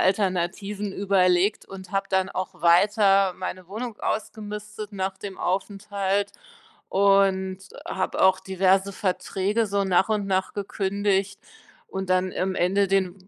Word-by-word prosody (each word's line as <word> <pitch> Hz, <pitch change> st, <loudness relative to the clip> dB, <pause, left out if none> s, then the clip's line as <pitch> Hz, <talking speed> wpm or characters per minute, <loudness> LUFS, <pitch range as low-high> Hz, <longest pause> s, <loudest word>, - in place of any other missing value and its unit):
Alternativen 195 Hz, +1 st, 0 dB
überlegt 190 Hz, 0 st, +2 dB
und 190 Hz, -2 st, -10 dB
habe 195 Hz, 0 st, -1 dB
dann 190 Hz, 0 st, +1 dB
auch 185 Hz, -1 st, -5 dB
weiter 195 Hz, +2 st, +4 dB
meine 185 Hz, -1 st, -6 dB
Wohnung 220 Hz, +4 st, -6 dB
ausgemistet 210 Hz, 0 st, -5 dB
nach 190 Hz, 0 st, -3 dB
dem 195 Hz, -2 st, -7 dB
Aufenthalt 200 Hz, +1 st, -1 dB, 0.6 s
und 195 Hz, -1 st, +3 dB, 0.3 s
habe 190 Hz, -1 st, -2 dB
auch 190 Hz, 0 st, +5 dB
diverse 190 Hz, +1 st, +1 dB
Verträge 200 Hz, +1 st, -1 dB
so 200 Hz, 0 st, 0 dB
nach 190 Hz, +2 st, +2 dB
und 210 Hz, -2 st, 0 dB
nach 190 Hz, -1 st, 0 dB
gekündigt 200 Hz, -1 st, -1 dB, 0.5 s
und 190 Hz, -1 st, -5 dB
dann 185 Hz, 0 st, +2 dB
am 190 Hz, +1 st, -1 dB
Ende 195 Hz, +3 st, +2 dB
den 190 Hz, -1 st, -1 dB
195 Hz, 125 wpm, -25 LUFS, 190-200 Hz, 0.6 s, auch